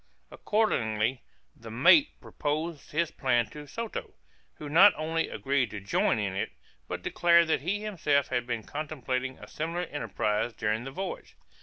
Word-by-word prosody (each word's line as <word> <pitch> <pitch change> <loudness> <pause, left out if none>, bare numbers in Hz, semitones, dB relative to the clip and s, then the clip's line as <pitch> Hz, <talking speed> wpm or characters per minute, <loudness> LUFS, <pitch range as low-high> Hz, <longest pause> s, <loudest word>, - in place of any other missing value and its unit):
Accordingly 120 - 0 0.3
the 115 - -11
mate 140 - +5
proposed 155 +1 -3
his 165 +1 0
plan 120 -6 +1
to 150 -1 -9
Soto, 230 +7 -6 0.4
who 150 - -8
not 180 +7 +7
only 165 +1 -1
agreed 135 -3 0
to 105 - -6
join 100 +4 +1
in 100 -3 -1
it, 95 - -2 0.4
but - - -5
declared 170 -1 +4
that 160 - +2
he 195 +7 -1
himself 150 -9 +1
had 125 -1 -1
been 120 -3 -2
contemplating 130 -3 -3
a - - -12
similar 165 +3 -3
enterprise 115 - -2
during 110 +2 -1
the 135 - -6
voyage. 190 +7 -6
140 Hz, 155 wpm, -28 LUFS, 120-165 Hz, 0.4 s, not